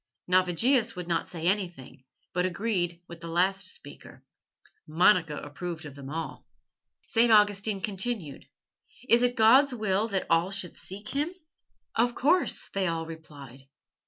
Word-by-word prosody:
Navigius 185 +8 +2
would 180 -1 -6
not 170 -1 -1
say 165 -2 -7
anything, 175 -9 -2 0.3
but 180 - 0
agreed 180 -3 -2
with 170 -1 -11
the 170 - -7
last 190 +4 0
speaker. - - -13 0.6
Monica 160 -1 +3
approved 160 +2 -7
of 145 - -9
them 140 -1 -10
all. 165 +2 -6 0.6
St. 230 0 +3
Augustine 205 -1 +3
continued: 195 - -4 0.6
"It 235 -1 +5
is 245 0 +2
God's 250 +4 +5
will 215 -1 0
that 195 -4 -2
all 165 +2 +2
should 190 -3 -1
seek 200 +3 -9
Him?" 295 +4 -2 0.6
"Of 240 +1 +1
course," 335 +7 +4
they 195 -1 -1
all 165 -1 -2
replied. 145 -5 -12
185 Hz, 140 wpm, -27 LUFS, 165-220 Hz, 0.6 s, It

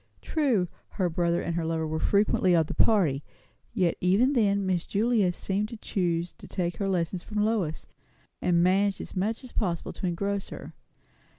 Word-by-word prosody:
True, 255 - +1 0.3
her 180 -4 +1
brother 170 +1 +1
and 170 - -2
her 170 0 -1
lover 160 0 -1
were 160 0 -2
frequently 200 -2 +3
of 165 -1 +4
the - - -5
party; 160 -11 +3 0.5
yet 185 -7 +1
even 205 +10 +3
then 200 -5 +2
Miss 180 -2 0
Julia 215 -3 +2
seemed 200 +4 -2
to 230 - -8
choose 175 -4 -1
to - - -11
take 175 -3 -2
her 200 -1 -1
lessons 175 -1 -1
from 210 +1 -1
Lois; 195 -9 -1 0.6
and 175 -1 +3
managed 195 +2 +2
as - - -8
much 215 +7 -1
as 255 - -11
possible 175 -6 -2
to 190 - -3
engross 200 +3 -2
her. - - -9
185 Hz, 180 wpm, -27 LUFS, 170-210 Hz, 0.6 s, of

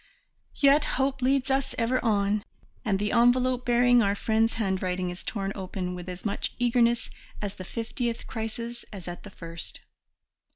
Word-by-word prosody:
Yet 285 +1 +5
hope 270 0 +1
leads 265 +1 +2
us 270 0 0
ever 245 +2 +1
on, 205 -2 +2 0.4
and 205 -6 +1
the 210 +1 -1
envelope 250 +1 +3
bearing 245 0 +5
our 200 -2 +2
friend's 225 +2 +2
handwriting 185 -4 -1
is 175 0 -9
torn 195 -3 -2
open 185 -2 -4
with 180 0 -7
as 180 +3 -7
much 205 - -2
eagerness 240 -1 +2 0.3
at 205 -1 -4
the 185 - -6
fiftieth 230 +3 -3
crisis 230 +1 -5
as 195 -4 -8
at 175 0 -6
the 205 - -10
first. 165 -3 -9
225 Hz, 160 wpm, -27 LUFS, 195-245 Hz, 0.4 s, Yet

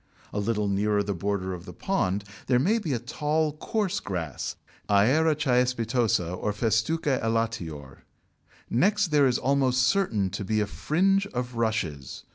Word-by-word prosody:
A 105 - -1
little 105 0 0
nearer 100 +1 +1
the 100 0 -2
border 95 +1 -2
of 90 0 -8
the - - -9
pond, 100 - -1 0.2
there 125 - +4
may 200 - +2
be 175 -9 -3
a - - +1
tall 150 +6 -1
coarse 205 +1 -1
grass 85 -8 -4 0.3
(Aira 135 +11 +4
caespitosa 125 - +1
or 105 - -2
Festuca 120 +7 0
elatior). 100 -12 -2 0.7
Next 200 - +2
there 145 -2 +5
is 125 - +2
almost 130 -2 +2
certain 125 - +1
to 100 - -4
be 110 +2 0
a 105 - +1
fringe 195 - +1
of 125 -5 -4
Rushes. 95 - -2
115 Hz, 150 wpm, -26 LUFS, 100-150 Hz, 0.7 s, there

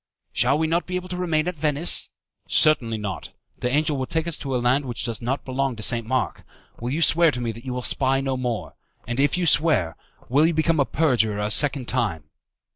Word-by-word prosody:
"Shall 135 +4 +2
we 160 - 0
not 165 +2 0
be 180 - -4
able 180 0 -4
to 180 - -4
remain 165 -3 0
at 180 - -2
Venice?" 150 +2 +1 0.4
"Certainly 120 -8 +3
not. 100 -4 -5 0.3
The 125 - -1
angel 150 +2 +1
will 130 -1 -3
take 160 0 -1
us 170 - -2
to 135 -2 -3
a - - +2
land 125 +4 +1
which 120 -2 -3
does 115 -3 -4
not 130 +4 -3
belong 135 0 -1
to 110 - -6
St. 115 -1 +2
Mark. 130 +1 -2 0.4
Will 120 - -4
you 155 +6 0
swear 165 +3 +5
to 125 -4 -3
me 120 -2 -2
that 115 +3 -12
you 130 - -4
will 125 - -4
spy 135 +3 +2
no 135 -1 -2
more? 125 -4 -3 0.3
And 120 +2 -3
if 145 +5 +2
you 180 - 0
swear, 150 - +3 0.3
will 145 +5 +3
you 170 - -1
become 160 0 +1
a 140 - +4
perjurer 125 -10 +1
a 105 +1 -2
second 140 0 +2
time?" 105 -11 -1
135 Hz, 230 wpm, -23 LUFS, 120-155 Hz, 0.4 s, swear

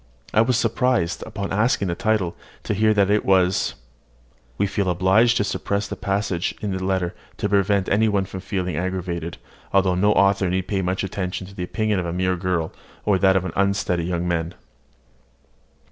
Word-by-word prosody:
I 110 - +5
was 120 +1 +2
surprised, 115 -6 +1
upon 100 -3 -4
asking 105 -1 +2
the - - 0
title, 105 -2 0 0.3
to - - -1
hear 110 +2 +3
that 100 -2 +3
it 105 - +2
was 95 -1 +2
____. - - -29 0.8
(We - - +2
feel 100 -1 -1
obliged 95 +7 +4
to 105 - +2
suppress 100 0 -2
the - - -5
passage 100 -3 -1
in 105 -2 -3
the 95 - -4
letter, 95 -2 0 0.2
to - - -1
prevent 100 -1 +2
any 110 +2 +3
one 100 -2 +1
from 95 - -7
feeling 90 -3 -3
aggrieved; 90 -2 -3 0.3
although 95 -1 +3
no 100 +4 +3
author 100 -2 +3
need 95 +1 -1
pay 100 -1 0
much 95 +1 -1
attention 95 -1 -3
to 95 - -13
the 90 - -6
opinion 110 +1 0
of 90 - -2
a 85 - -3
mere 90 +1 +1
girl, 90 -3 -1 0.3
or 100 -3 +3
that 95 -1 +4
of 95 -1 +1
an - - -4
unsteady 100 -3 +1
young 90 0 -2
man.) 85 0 -1
95 Hz, 190 wpm, -23 LUFS, 90-105 Hz, 0.8 s, I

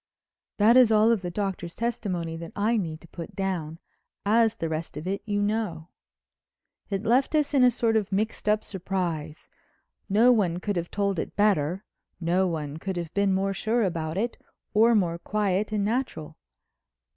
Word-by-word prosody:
That 220 +4 +6
is 250 -3 +6
all 215 +1 +5
of 225 -5 +1
the 180 - -4
Doctor's 180 -3 -4
testimony 200 -9 -2
that 165 0 -8
I 215 +3 +1
need 170 -5 -3
put 165 -2 -8
down 180 -5 -3 0.5
as 225 +1 +3
the 165 - -3
rest 160 0 -4
of 155 - -6
it 195 +2 -2
you 205 -1 0
know. 205 -6 -2 1.0
It 195 0 -2
left 250 +7 +2
us 300 -1 +1
in 270 -3 +5
a 250 - +7
sort 230 -2 0
of 210 -3 0
mixed 210 +2 -1
up 215 0 +2
surprise. 175 -5 -4 0.6
No 225 +5 +5
one 185 -7 +2
could 205 +2 -2
have 170 -1 -2
told 200 -3 -1
it - - -5
better, 190 -3 +1 0.3
no 180 +2 +1
one 155 -3 -4
could 190 +2 -4
have 170 -2 -5
been 200 -1 +2
more 195 +1 +1
sure 225 +4 0
about 165 -3 -2
it 235 +3 -2 0.3
or 225 +2 +5
more 170 -5 +1
quiet 205 +1 -1
and 205 -2 0
natural. 210 - -2
195 Hz, 175 wpm, -26 LUFS, 170-220 Hz, 1.0 s, a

